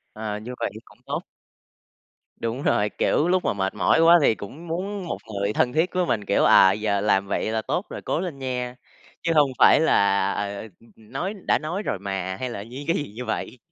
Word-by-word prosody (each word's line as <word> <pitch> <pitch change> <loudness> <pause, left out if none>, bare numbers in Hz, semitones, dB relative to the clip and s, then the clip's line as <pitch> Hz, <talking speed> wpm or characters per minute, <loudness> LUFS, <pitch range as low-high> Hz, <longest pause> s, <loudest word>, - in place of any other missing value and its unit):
À, 110 -1 -4
như 120 +4 -7
vậy - - -1
cũng - - -20
tốt. - - -3 1.2
Đúng 115 +3 -3
rồi, 105 -3 +2
kiểu, 155 - +1
lúc 185 0 +2
mà - - +1
mệt 95 -1 -2
mỏi 100 - +3
quá 170 +1 +7
thì 115 - +4
cũng 145 - -10
muốn 185 +3 -4
một - - -3 0.2
người 100 +1 -1
thân 125 +3 +1
thiết 165 +3 +1
với 180 -1 +1
mình, 105 -10 -1
kiểu, - - +2
à, 95 - +7
giờ 105 0 0
làm 100 -1 +2
vậy 105 - -1
là 110 0 0
tốt 180 - -2
rồi, - - -7
cố - - -1
lên 170 -6 -5
nha, 125 -2 -3 0.5
chứ 170 - +1
hông 145 -2 +5
phải - - +7
là, 100 -9 +3
ờ, 100 0 -3
ừm, 110 - -9 0.3
ừm, 110 +1 -20
nói 175 +9 -3
đã - - +3
nói 165 +6 -3
rồi 100 - -2
mà, 95 -2 -3
hay 130 -1 -3
là 100 -4 -6
dí 130 +6 -9
gì 145 -11 -3
như 125 +2 -6
vậy. 110 +3 -4
115 Hz, 225 wpm, -24 LUFS, 100-160 Hz, 1.2 s, quá